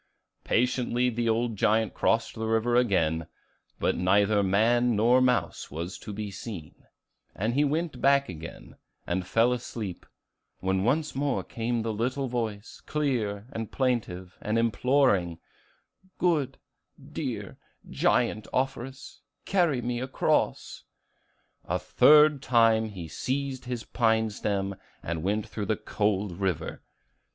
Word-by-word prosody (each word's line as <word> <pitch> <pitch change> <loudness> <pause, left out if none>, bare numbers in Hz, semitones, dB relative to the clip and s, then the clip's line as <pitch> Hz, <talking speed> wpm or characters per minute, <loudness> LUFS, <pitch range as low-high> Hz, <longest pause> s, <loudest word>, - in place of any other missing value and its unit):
Patiently 125 0 +1
the 115 0 -1
old 115 0 0
giant 110 +2 +2
crossed 115 0 +1
the 110 -1 -4
river 115 +2 +1
again; 80 -9 +2 0.5
but - - +1
neither 100 +3 +3
man 115 +5 +3
nor 120 +5 +4
mouse 125 -1 0
was 85 +5 -5
to 105 - -8
be 105 0 -5
seen; 95 -5 -7 0.6
and 110 +4 -1
he 145 +3 +3
went 150 -1 -1
back 140 0 +4
again, 85 -2 -9 0.3
and 90 +1 -2
fell 115 +2 +3
asleep, 115 -6 -6 0.5
when 95 0 0
once 150 +7 +1
more 140 0 -1
came 115 0 -2
the 110 -1 -2
little 130 +5 -1
voice, 115 -3 -4
clear, 115 -9 -1
and 115 -5 -5
plaintive, 105 -9 -2
and 110 +2 -1
imploring, 115 - +2 0.8
"Good, 150 -7 +1 0.6
dear, - - -4 0.3
giant 110 - +1
Offerus, 130 +1 -3 0.2
carry 170 -10 +2
me 120 0 -2
across." 130 +1 0 0.8
The - - 0
third 150 -2 +5
time 115 -3 +3
he 90 -5 -7
seized 130 - -3
his 125 -2 -4
pine 110 -2 +1
stem, 100 -1 -2 0.3
and 85 -1 -3
went 105 +4 0
through 105 -3 -5
the 110 - +1
cold 100 -3 -1
river. 90 -5 -2
115 Hz, 125 wpm, -27 LUFS, 100-125 Hz, 0.8 s, third